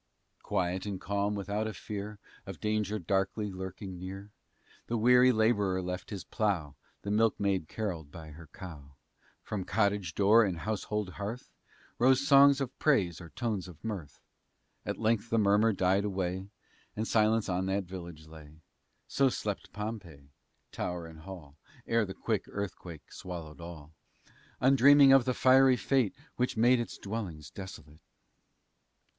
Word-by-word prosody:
Quiet 90 Hz, +2 st, -1 dB
and 100 Hz, -2 st, -4 dB
calm 100 Hz, +2 st, -1 dB
without 100 Hz, +2 st, -2 dB
a 110 Hz, -, -5 dB
fear 105 Hz, 0 st, -6 dB, 0.3 s
Of 95 Hz, -3 st, -7 dB
danger 105 Hz, -1 st, -1 dB
darkly 100 Hz, +3 st, -1 dB
lurking 95 Hz, 0 st, -7 dB
near, 95 Hz, +3 st, -8 dB, 0.6 s
The 120 Hz, -, -1 dB
weary 125 Hz, +3 st, +6 dB
laborer 105 Hz, -5 st, +2 dB
left 90 Hz, 0 st, -5 dB
his 100 Hz, -4 st, -5 dB
plough, 95 Hz, -, -1 dB, 0.3 s
The 100 Hz, -, -3 dB
milkmaid 100 Hz, -5 st, +1 dB
carolled 85 Hz, -7 st, -4 dB
by 80 Hz, -1 st, -10 dB
her 80 Hz, +2 st, -12 dB
cow; 75 Hz, -4 st, -11 dB, 0.5 s
From 105 Hz, -3 st, -4 dB
cottage 100 Hz, -4 st, 0 dB
door 105 Hz, +3 st, +6 dB
and 95 Hz, -5 st, -1 dB
household 105 Hz, -1 st, -2 dB
hearth 110 Hz, +5 st, -5 dB, 0.5 s
Rose 130 Hz, +2 st, +4 dB
songs 140 Hz, -1 st, +7 dB
of 130 Hz, -2 st, -3 dB
praise, 95 Hz, -, +2 dB
or 85 Hz, -, -10 dB
tones 105 Hz, -, -3 dB
of 85 Hz, -5 st, -14 dB
mirth. 95 Hz, -10 st, -6 dB, 0.7 s
At -, -, -2 dB
length 115 Hz, 0 st, 0 dB
the 115 Hz, -, +1 dB
murmur 105 Hz, +1 st, +4 dB
died 95 Hz, 0 st, +2 dB
away, 95 Hz, -1 st, -3 dB, 0.5 s
And 110 Hz, +1 st, -2 dB
silence 110 Hz, 0 st, +2 dB
on 95 Hz, 0 st, -1 dB
that 95 Hz, +1 st, 0 dB
village 85 Hz, -4 st, -9 dB
lay. 80 Hz, -1 st, -13 dB, 0.5 s
So 135 Hz, -1 st, +3 dB
slept 105 Hz, -5 st, -4 dB
Pompeii, 95 Hz, -10 st, -7 dB, 0.4 s
tower 90 Hz, -1 st, -4 dB
and 80 Hz, -1 st, -11 dB
hall, 80 Hz, -5 st, -11 dB, 0.3 s
Ere 115 Hz, -1 st, +2 dB
the 95 Hz, -, -7 dB
quick 110 Hz, -4 st, -1 dB
earthquake 90 Hz, -5 st, -7 dB
swallowed 85 Hz, -4 st, -8 dB
all, 80 Hz, -3 st, -10 dB, 0.7 s
Undreaming 135 Hz, +1 st, +7 dB
of 135 Hz, -3 st, +6 dB
the 125 Hz, -1 st, 0 dB
fiery 130 Hz, 0 st, +5 dB
fate 130 Hz, -7 st, +1 dB, 0.2 s
Which 125 Hz, -2 st, 0 dB
made 120 Hz, +2 st, +5 dB
its 120 Hz, -, -4 dB
dwellings 95 Hz, -9 st, -6 dB
desolate! 80 Hz, -6 st, -10 dB
100 Hz, 145 wpm, -30 LUFS, 90-110 Hz, 0.7 s, songs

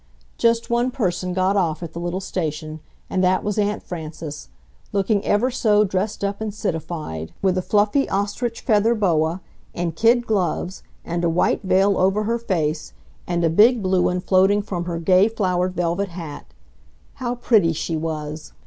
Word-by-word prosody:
Just 230 Hz, 0 st, +2 dB
one 240 Hz, +1 st, +2 dB
person 185 Hz, -7 st, -2 dB
got 185 Hz, +2 st, +1 dB
off 175 Hz, -4 st, 0 dB
at 170 Hz, -, -7 dB
the 170 Hz, -, -5 dB
little 175 Hz, +2 st, -2 dB
station, 155 Hz, -4 st, -4 dB, 0.3 s
and 185 Hz, -, 0 dB
that 185 Hz, 0 st, +2 dB
was 210 Hz, 0 st, -1 dB
Aunt 210 Hz, 0 st, 0 dB
Frances, 155 Hz, -, -7 dB, 0.4 s
looking 200 Hz, +1 st, +1 dB
ever 235 Hz, +6 st, +2 dB
so 210 Hz, -4 st, +3 dB
dressed 200 Hz, +1 st, -2 dB
up 200 Hz, +1 st, -2 dB
and 220 Hz, -1 st, -2 dB
citified, 160 Hz, -, -4 dB
with 190 Hz, -2 st, +3 dB
a 185 Hz, -, 0 dB
fluffy 210 Hz, +8 st, +2 dB
ostrich 205 Hz, +4 st, -2 dB
feather 220 Hz, +2 st, +3 dB
boa 170 Hz, -4 st, +1 dB, 0.3 s
and 170 Hz, -2 st, -2 dB
kid 235 Hz, +5 st, +3 dB
gloves 190 Hz, -3 st, -1 dB, 0.2 s
and 170 Hz, 0 st, -2 dB
a 170 Hz, -, +3 dB
white 165 Hz, +2 st, +1 dB
veil 195 Hz, 0 st, +2 dB
over 195 Hz, +3 st, +2 dB
her 230 Hz, +2 st, -1 dB
face 160 Hz, -8 st, -2 dB, 0.3 s
and 175 Hz, -1 st, 0 dB
a 165 Hz, -, +3 dB
big 220 Hz, +5 st, +5 dB
blue 185 Hz, -1 st, +2 dB
one 180 Hz, 0 st, +1 dB
floating 195 Hz, +2 st, +3 dB
from 175 Hz, -4 st, -4 dB
her 170 Hz, -1 st, -3 dB
gay 185 Hz, +4 st, +4 dB
flowered 185 Hz, -4 st, -1 dB
velvet 175 Hz, +3 st, -1 dB
hat. 165 Hz, -4 st, -8 dB, 0.7 s
How 245 Hz, -1 st, -1 dB
pretty 220 Hz, -8 st, +3 dB
she 165 Hz, +1 st, -3 dB
was! 155 Hz, -1 st, -5 dB
185 Hz, 170 wpm, -22 LUFS, 170-210 Hz, 0.7 s, big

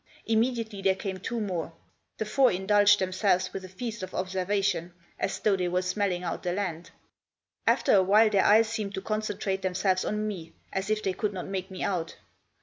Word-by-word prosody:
Imme 230 Hz, +3 st, +2 dB
diately 220 Hz, -4 st, -5 dB
there 190 Hz, -1 st, +3 dB
came 190 Hz, -1 st, -5 dB
two 230 Hz, +5 st, -3 dB
more. 180 Hz, -6 st, -3 dB, 0.4 s
The 220 Hz, -, -2 dB
four 250 Hz, +4 st, +4 dB
indulged 205 Hz, +2 st, +4 dB
themselves 185 Hz, -1 st, +1 dB
with 195 Hz, -, -5 dB
a 185 Hz, -, -9 dB
feast 220 Hz, +3 st, -5 dB
of 185 Hz, 0 st, -6 dB
observation, 185 Hz, -2 st, -1 dB, 0.2 s
as -, -, -1 dB
though 210 Hz, -2 st, +3 dB
they 180 Hz, -2 st, -1 dB
were 180 Hz, +1 st, 0 dB
smelling 180 Hz, -1 st, -1 dB
out 170 Hz, -, -3 dB
the 175 Hz, -, -1 dB
land. 180 Hz, -4 st, -3 dB, 0.8 s
After -, -, +4 dB
a 195 Hz, -, +7 dB
while 210 Hz, +4 st, +5 dB
their 200 Hz, -2 st, +4 dB
eyes 220 Hz, +2 st, +6 dB
seemed 215 Hz, -3 st, -3 dB
to 190 Hz, -, -3 dB
concentrate 210 Hz, -2 st, -2 dB
themselves 185 Hz, 0 st, +1 dB
on 210 Hz, 0 st, -1 dB
me, 170 Hz, -6 st, -6 dB, 0.2 s
as 190 Hz, +1 st, -2 dB
if 215 Hz, 0 st, 0 dB
they 190 Hz, -, 0 dB
could 205 Hz, +2 st, -2 dB
not 185 Hz, -, -5 dB
make 190 Hz, -1 st, -4 dB
me 190 Hz, -, -5 dB
out. 175 Hz, -5 st, -2 dB
195 Hz, 200 wpm, -28 LUFS, 185-210 Hz, 0.8 s, a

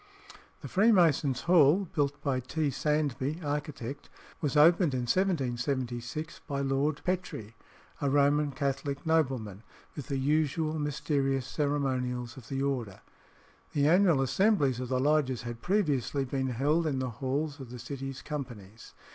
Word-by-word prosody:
The -, -, -6 dB
Freemasons' 170 Hz, -, +3 dB
Hall, 175 Hz, +2 st, +4 dB
built 145 Hz, -1 st, 0 dB
by 135 Hz, -3 st, 0 dB
T. 145 Hz, +3 st, -1 dB
Sandby, 150 Hz, +1 st, -1 dB
architect, 145 Hz, -2 st, -4 dB, 0.3 s
was 145 Hz, -2 st, 0 dB
opened 165 Hz, -1 st, +5 dB
in 125 Hz, -, -1 dB
1776, 130 Hz, -2 st, -1 dB
by 140 Hz, -3 st, -2 dB
Lord 140 Hz, +2 st, 0 dB
Petre, 180 Hz, -, -3 dB, 0.5 s
a 140 Hz, -, +1 dB
Roman 145 Hz, +1 st, +3 dB
Catholic 140 Hz, +1 st, -3 dB
nobleman, 130 Hz, -11 st, 0 dB, 0.3 s
with 145 Hz, -, -7 dB
the 140 Hz, -, -2 dB
usual 155 Hz, +3 st, 0 dB
mysterious 140 Hz, -2 st, 0 dB
ceremonials 130 Hz, -5 st, -1 dB
of 125 Hz, -4 st, -12 dB
the 135 Hz, +2 st, -2 dB
order. 120 Hz, -9 st, -2 dB, 0.7 s
The 145 Hz, 0 st, +2 dB
annual 175 Hz, -4 st, +4 dB
assemblies 140 Hz, -, +2 dB
of 125 Hz, -1 st, -4 dB
the 130 Hz, -1 st, +1 dB
lodges 140 Hz, -3 st, +1 dB
had 120 Hz, -1 st, -6 dB
previously 145 Hz, -, 0 dB
been 130 Hz, 0 st, -2 dB
held 145 Hz, +7 st, +1 dB
in 140 Hz, -3 st, -1 dB
the 130 Hz, -1 st, -2 dB
halls 145 Hz, +3 st, -1 dB
of 130 Hz, -3 st, -9 dB
the 125 Hz, -, -8 dB
City's 135 Hz, +2 st, -6 dB
companies. 115 Hz, -8 st, -8 dB
140 Hz, 140 wpm, -29 LUFS, 130-155 Hz, 0.7 s, opened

